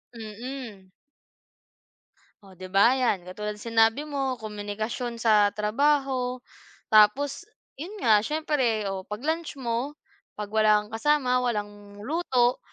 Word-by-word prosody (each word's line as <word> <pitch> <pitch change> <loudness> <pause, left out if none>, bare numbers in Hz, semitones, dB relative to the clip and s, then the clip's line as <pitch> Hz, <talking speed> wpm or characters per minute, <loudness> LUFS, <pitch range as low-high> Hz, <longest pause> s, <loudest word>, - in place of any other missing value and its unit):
Mm. 220 -3 -8 1.5
Oh 195 - -16
'di 185 - -7
ba, 200 +6 +5
'yan, 245 -8 +1
katulad 210 +4 -5
ng 210 +3 -11
sinabi 225 +5 +3
mo, 275 -3 -2
komunikasyon 215 +2 -5
sa 215 -3 +4
trabaho. 255 +2 0 0.5
Tapos 220 - +4 0.3
'yun 365 +8 -7
nga, 220 -3 +6
siyempre, 260 -4 0
o 190 0 -6
'pag 210 +4 -6
lunch 320 0 -2
mo, 255 +2 -3 0.4
'pag 210 -1 -6
wala 215 -1 +4
kang 210 - -16
kasama, 250 +1 +2
walang 205 -4 -4
luto, 255 -4 +1
230 Hz, 125 wpm, -26 LUFS, 210-265 Hz, 1.5 s, nga